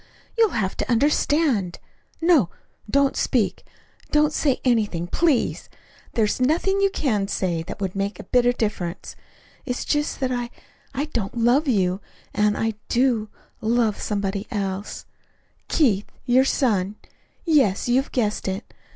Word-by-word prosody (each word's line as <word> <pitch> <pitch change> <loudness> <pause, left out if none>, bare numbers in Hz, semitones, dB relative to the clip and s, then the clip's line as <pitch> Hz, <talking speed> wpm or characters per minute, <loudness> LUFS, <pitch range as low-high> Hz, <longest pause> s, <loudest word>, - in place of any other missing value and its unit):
You'll 450 - +3
have 190 -2 -1
to - - -2
understand. 275 - +2 0.4
No 325 - +4 0.4
don't 280 +3 +2
speak, 230 -6 0 0.5
don't 300 0 +3
say 280 -4 +1
anything, 210 -9 +1
please. 290 - 0 0.4
There's 220 +2 +1
nothing 345 +9 +2
you 395 - +4
could 215 - -1
say 180 -4 -1
that 165 - -7
that 205 - -7
would 190 -1 -2
make 200 0 -2
a - - -7
bit 245 -1 +2
of 245 - +2
difference. 190 -5 -3 0.5
It's 250 -2 -3
just 295 0 0
that 260 -1 0
I 245 -1 -2 0.5
I 280 +3 0
don't 235 -7 -4
love 245 +6 +3
you 190 -5 +1 0.3
and 210 0 +2
I 225 0 0 0.2
do 235 -4 +2 0.3
love 225 -1 +1
somebody 200 0 -2
else 200 -2 -4 0.6
Keith, 215 - +2 0.2
your 255 +2 +4
son 210 -8 +1 0.5
yes, 275 - +3
you 245 +1 +3
have - - -13
guessed 215 -6 -1
it. 190 +3 -4
235 Hz, 145 wpm, -23 LUFS, 200-275 Hz, 0.6 s, No